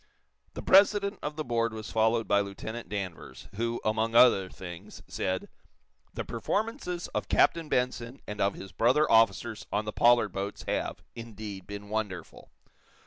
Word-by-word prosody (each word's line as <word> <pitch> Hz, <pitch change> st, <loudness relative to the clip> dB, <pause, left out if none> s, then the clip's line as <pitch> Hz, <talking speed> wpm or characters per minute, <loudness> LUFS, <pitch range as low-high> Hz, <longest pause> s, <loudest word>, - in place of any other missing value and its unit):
The -, -, -6 dB
president 200 Hz, +1 st, +4 dB
of 150 Hz, 0 st, -4 dB
the 155 Hz, -, -3 dB
board 115 Hz, -3 st, 0 dB
was 110 Hz, -1 st, -7 dB
followed 110 Hz, +1 st, +2 dB
by 100 Hz, -, +4 dB
Lieutenant 100 Hz, +4 st, -5 dB
Danvers, 100 Hz, -5 st, -6 dB
who, 115 Hz, +3 st, -2 dB
among 110 Hz, +1 st, 0 dB
other 110 Hz, -6 st, +6 dB
things 85 Hz, -2 st, -10 dB
said: 95 Hz, 0 st, -2 dB, 0.7 s
"The -, -, -3 dB
performances 180 Hz, -, -2 dB
of -, -, -3 dB
Captain 165 Hz, -2 st, +3 dB
Benson 125 Hz, 0 st, -1 dB
and 105 Hz, 0 st, -5 dB
of 100 Hz, 0 st, +2 dB
his 95 Hz, -, -9 dB
brother 130 Hz, +7 st, +3 dB
officers 115 Hz, 0 st, +3 dB
on 105 Hz, +1 st, 0 dB
the 105 Hz, -, -4 dB
Pollard 120 Hz, -2 st, +4 dB
boats 100 Hz, +2 st, -5 dB
have, -, -, -2 dB
indeed, 105 Hz, -4 st, -8 dB
been 100 Hz, 0 st, -8 dB
wonderful. 105 Hz, -6 st, -5 dB
110 Hz, 150 wpm, -29 LUFS, 100-120 Hz, 0.7 s, other